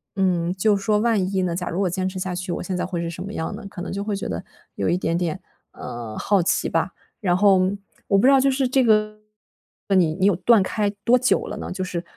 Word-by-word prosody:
嗯， 180 -2 +1
就 205 +2 +2
是 195 - -7
说 210 +1 +2
万 210 -4 +1
一 190 - +2
呢， 175 -2 -1
假 180 0 -4
如 185 +4 -2
我 185 - +1
坚 185 +1 -2
持 185 - -8
下 185 0 -3
去， 180 0 -4
我 - - -4
现 185 +1 -3
在 - - -1
会 175 -2 -3
是 170 - -3
什 170 - -7
么 200 +2 -7
样 160 +2 -3
呢？ 210 -1 -9
可 175 - -8
能 185 - -5
就 200 - -3
会 210 -1 -2
觉 195 - -4
得， 85 -2 -3 0.3
有 100 - -1
一 175 - +2
点 165 -2 -1
点， 170 -3 -2 0.3
呃， 115 -2 -7
好 200 -2 +2
奇 - - +1
吧。 - - -1 0.3
然 180 -4 +2
后， 195 -1 +5 0.5
我 200 - +3
不 195 - +3
知 - - +7
道 275 - +6
就 275 +1 +3
是 265 0 0
这 260 +1 +2
个， 215 -2 +2 0.7
那 195 - +3
你 160 -4 +2
你 190 - 0
有 205 - +4
断 220 +3 +4
开 205 +2 -1 0.2
多 245 +2 +5
久 255 +1 +2
了 210 - -6
呢？ - - -6
就 185 +1 -3
是， 180 -2 -3
190 Hz, 290 characters per minute, -23 LUFS, 180-210 Hz, 0.7 s, 知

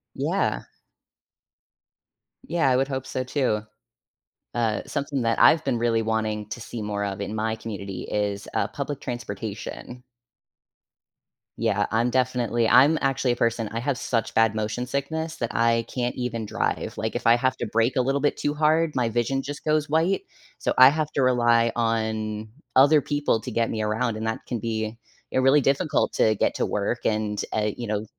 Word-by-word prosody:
Yeah. - - 0 1.8
Yeah, 165 -4 +2
I 130 - +3
would 135 +1 +2
hope 135 -1 -4
so 130 - -3
too. 125 -5 0 0.9
Uh, 115 -3 0
something 140 -2 -2
that 115 0 +1
I've 130 +7 +6
been 130 -4 0
really 115 -1 +1
wanting 110 -1 -2
to 120 - -5
see 115 0 -7
more 105 -1 -2
of 100 0 -4
in 105 +2 -4
my 110 +1 -1
community 100 -4 -6
is, 100 -1 -2
uh, - - +1
public 145 -1 -5
transportation. 120 +1 -6 1.5
Yeah, 105 -3 +1
I'm 115 +2 +2
definitely 120 -2 +1
I'm 145 +8 +6
actually 135 -2 +1
a - - 0
person, 115 -2 0
I 115 - -3
have 140 +1 -1
such 115 -2 -1
bad 110 -1 +3
motion 110 +3 -2
sickness 160 +4 -3
that 120 - -4
I 115 0 +3
can't 125 -1 -1
even 115 -3 -3
drive. - - -2
Like - - -3
if - - -1
I 115 - +7
have 130 +1 +1
to 120 - -3
brake 115 +4 +1
a 130 - +3
little 135 +2 0
bit 145 - +1
too 145 0 -1
hard, 155 +1 +2
my 125 -2 +1
vision 120 +4 0
just 145 +1 -7
goes 155 -1 +1
white. 165 - +1 0.4
So - - -1
I 130 - +10
have 155 +1 -2
to 140 - 0
rely 120 -2 +3
on 110 -2 -1 0.3
other 145 +3 +6
people 145 -5 0
to 125 - -6
get 115 +1 0
me 110 -1 -2
around, 110 +1 -1
and 110 - -4
that 110 0 -2
can 120 -3 -3
be 110 0 -3 0.3
eh - - -1
really 135 +3 +5
difficult 140 +3 +1
to 110 - +3
get - - 0
to - - 0
work 105 +4 -2
and, 105 -1 0
uh, 105 -1 +1
you 120 - -4
know, 105 0 -2
120 Hz, 185 wpm, -25 LUFS, 110-135 Hz, 1.8 s, I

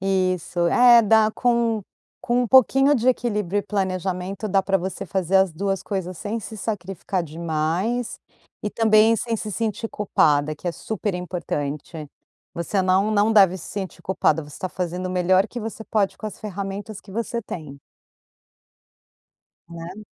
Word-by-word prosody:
isso, 185 -2 0
é 240 +3 +7
dá 220 0 +4
com 235 -3 +1 0.4
com 245 +1 +1
um 240 - -2
pouquinho 270 +3 +5
de 250 -3 +2
equilíbrio 210 -6 0
e - - -10
planejamento 190 0 -2
dá 195 0 +3
para 195 0 +1
você 190 +2 -5
fazer 190 +1 +1
as 190 -2 +3
2 195 +3 -2
coisas 185 -3 -4
sem 220 +2 -3
se 220 +1 -8
sacrificar 195 -3 -3
demais 170 +8 -2 0.4
e 210 - -2
também 220 +1 +4
sem 230 +1 -2
se 215 0 -5
sentir 225 +1 -2
culpada, 155 -8 +2
que 165 - -10
é 175 - 0
super 210 +1 -3
importante. 155 -3 -4 0.4
Você 180 +3 -1
não 190 +3 +2
não 210 +2 +3
deve 195 -4 +6
se 175 - -10
sentir 195 -3 -6
culpada, 165 -4 +1
você 145 -1 -12
está 185 - -4
fazendo 180 0 -3
o 185 - -3
melhor 185 +2 +3
que 240 +2 -7
você 220 0 -6
pode 205 -3 0
com - - -5
as 210 - -8
ferramentas 200 0 -6
que 195 - -14
você 230 +1 -2
tem. 155 -9 -8 1.9
Né. 170 +5 -8
195 Hz, 160 wpm, -23 LUFS, 180-220 Hz, 1.9 s, é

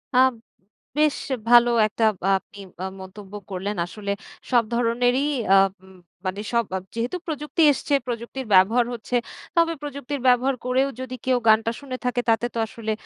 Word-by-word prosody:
আ - - +4 0.8
বেশ 300 -1 +3 0.3
ভালো 240 0 +7 0.2
একটা 215 +2 -3 0.2
আ - - +3
আপনি 200 - -17 0.2
আ - - -1 0.2
মন্তব্য 190 +1 -11 0.2
করলেন 195 +3 -3
আসলে 200 +3 -5 0.4
সব 240 -2 +5
ধরনেরই 245 +2 +2 0.3
আ - - +8 0.3
ম 190 0 -16 0.3
মানে 185 +2 -2
সব 235 0 +3
বাব 190 -1 -3
যেহেতু 235 +10 -2
প্রযুক্তি 300 +1 -2
এসছে 285 +1 -2
প্রযুক্তির 240 +2 -5
ব্যবহার 215 +6 +5
হচ্ছে। 240 +1 -4 0.4
তবে 335 -1 +3
প্রযুক্তির 285 -1 -5
ব্যবহার 255 +2 +4
করেও 260 +2 +2
যদি 260 0 -5
কেউ 255 -1 +3
গানটা 220 +1 +5
শুনে 265 -2 -6
থাকে 250 0 +1
তাতে 225 +1 +2
তো 230 - -3
আসলে 220 0 -5
240 Hz, 160 wpm, -23 LUFS, 215-260 Hz, 0.8 s, আ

